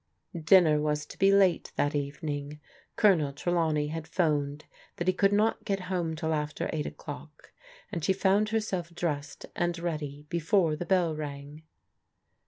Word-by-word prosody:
Dinner 160 -2 +5
was 150 0 -1
to - - -12
be 195 0 +5
late 195 -3 +3
that 145 - +1
evening. 145 0 -4 0.4
Colonel 175 -10 +4
Trelaw 165 +3 0
ney 150 -1 0
had 160 0 -5
'phoned 150 -4 0 0.3
that 175 - -4
he 185 - +4
could 195 +2 +3
not 215 +2 +2
get 195 -2 -1
home 170 -3 -1
till 160 0 -1
after 150 -1 -2
right 150 -2 -2
o'clock, 150 0 -10 0.4
and 165 - -4
she - - +3
found 195 +2 +2
herself 205 -6 -2
dressed 150 -4 -3
and 175 0 0
ready 150 -4 -4
before 165 0 +2
the 170 +3 -6
bell 175 -4 +2
rang. 145 0 -7
160 Hz, 160 wpm, -29 LUFS, 150-180 Hz, 0.4 s, Dinner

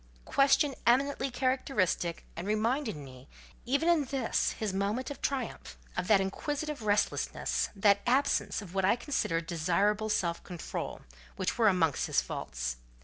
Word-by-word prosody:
—question 275 +1 +3
eminently 275 +3 +3
characteristic, 245 - 0
and 170 +3 -5
reminding 215 - 0
me, 130 0 -13 0.4
even 280 +6 +1
in 335 -4 +4
this 260 -2 0
his 215 -3 -3
moment 205 +8 -1
of 285 - -8
triumph, 265 -4 -3 0.2
of 180 - -2
that 210 -2 +6
inquisitive 290 +9 -3
restlessness, 210 -1 0
that 200 0 +4
absence 240 -6 +1
of 180 -3 -11
what 190 -1 0
I 190 - +4
considered 175 - -1
desirable 195 +6 +1
self 170 -5 0
control, 175 -2 -5 0.3
which - - -1
were 225 - +5
amongst 165 -7 +2
his - - +3
faults. - - -4
210 Hz, 145 wpm, -30 LUFS, 180-265 Hz, 0.4 s, that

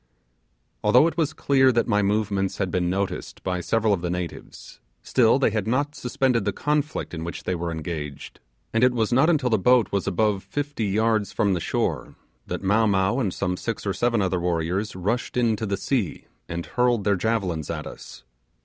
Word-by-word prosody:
Although 125 +8 +6
it 165 - 0
was 160 -4 +1
clear 130 -2 +3
that 115 -1 +1
my 105 -3 +2
movements 100 -1 0
had 95 -3 -1
been 90 -1 0
noticed 95 +1 -3
by 90 -1 -1
several 110 +3 +1
of 95 - -1
the 90 - -2
natives, 90 -1 -6 0.2
still 120 -1 +4
they 135 -5 +2
had 105 -2 -2
not 140 +5 0
suspended 125 -3 0
the 100 - 0
conflict 150 - -2
in 80 -1 -4
which 85 - -6
they 95 - -1
were 85 -1 -3
engaged, 80 -3 -6 0.3
and 115 +2 +2
it 125 0 +5
was 115 0 +1
not 135 +6 +4
until 140 -7 +2
the 110 - +3
boat 125 +3 +4
was 100 -1 -1
above 100 +1 +1
fifty 145 -6 -3
yards 110 0 +1
from 100 -2 +1
the 90 - 0
shore - - -2 0.3
that - - -4
Mow 105 +3 +3
Mow 100 +4 +2
and 105 -8 0
some 90 0 -2
six 115 +4 -4
or 100 - 0
seven 115 -2 +1
other 95 -1 0
warriors 90 +4 -1
rushed 105 +8 -2
into 115 -3 +1
the 100 0 -1
sea 115 - -2 0.2
and 85 0 -4
hurled 125 -3 +1
their 100 +1 +2
javelins 95 -6 -1
at - - -4
us. - - -10
105 Hz, 195 wpm, -24 LUFS, 95-120 Hz, 0.3 s, Although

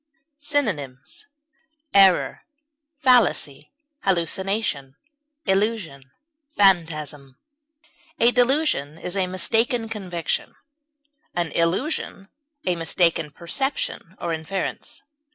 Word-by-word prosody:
Synonyms: 185 - -3 0.7
error, 195 -3 +5 0.5
fallacy, 240 - +2 0.3
hallucination, 185 -5 -1 0.5
illusion, 190 - -1 0.5
phantasm. 155 -8 +1 0.8
A 235 +1 +6
delusion 245 - +1
is 180 +3 -4
a 190 -2 +1
mistaken 225 +6 +1
conviction, 180 -6 -3 0.8
an 170 -3 -1
illusion 195 - -1 0.4
a 180 - +1
mistaken 165 -1 +1
perception 270 - -3
or 170 - -2
inference. 165 +4 -4
185 Hz, 75 wpm, -23 LUFS, 160-225 Hz, 0.8 s, A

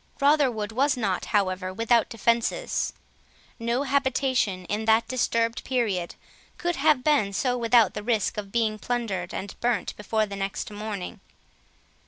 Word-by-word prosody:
Rotherwood 275 -7 +2
was 270 +4 +2
not, 195 -6 -1
however, 185 -2 0
without 230 +3 +2
defences; 235 - 0 0.7
no 235 +4 0
habitation, 265 -8 +1
in 210 +4 -2
that 225 +1 +4
disturbed 230 -2 0
period, 215 -9 -1 0.4
could 350 -1 -1
have 295 -3 +3
been 275 -10 +2
so, 250 +4 +1
without 235 -3 +4
the 210 - -4
risk 220 -2 0
of 200 -2 -6
being 220 -2 0
plundered 210 -8 -2
and 195 +1 -5
burnt 240 -2 0
before 215 +1 0
the 200 -1 -7
next 195 +1 -4
morning. 205 -3 -5
230 Hz, 140 wpm, -26 LUFS, 205-250 Hz, 0.7 s, that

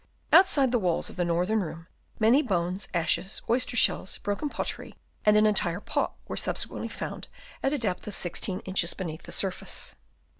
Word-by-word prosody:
Outside 295 -9 +6
the 245 - +3
walls 180 -4 0
of - - -13
the 180 - 0
northern 180 +6 +1
room, 165 -1 -6 0.3
many 230 +6 +5
bones, 185 - -1
ashes, 175 +3 -1
oyster 245 +1 +1
shells, 190 - +3
broken 205 +9 -2
pottery - - -4 0.3
and 210 0 +7
an 215 - +5
entire 185 -4 +1
pot - - -2
were - - -4
subsequently - - -2
found - - -6 0.3
at 270 - +1
a 295 - +1
depth 205 -8 -3
of 205 - -4
16 180 +2 -2
inches 185 -2 0
beneath 165 -3 -5
the - - -10
surface. 190 -2 -2
195 Hz, 175 wpm, -28 LUFS, 175-225 Hz, 0.3 s, and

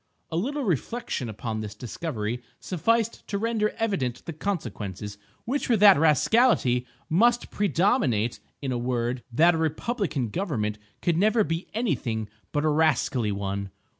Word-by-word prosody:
A - - -2
little 275 - -1
reflection 200 - -2
upon 110 +1 -4
this 105 -1 -6
discovery 120 -6 -4 0.2
sufficed 225 +6 0
to 200 - -1
render 220 0 +1
evident 170 - -1
the 170 - -5
consequences, 105 - -4 0.3
which 270 +3 -1
were 235 - +4
that 200 -1 +8
rascality 150 - +3 0.2
must 240 +8 +3
predominate—in 160 - 0
a 120 - -1
word, 120 0 -1
that 165 +9 +5
a 165 - -1
republican 160 - -1
government 110 - -2 0.2
could 170 -2 +2
never 215 +4 +4
be 165 -1 -3
any 230 -1 +1
thing 110 -4 -3 0.2
but 145 +1 0
a - - +4
rascally 140 -7 +2
one. 100 0 -3
155 Hz, 140 wpm, -26 LUFS, -, 0.3 s, that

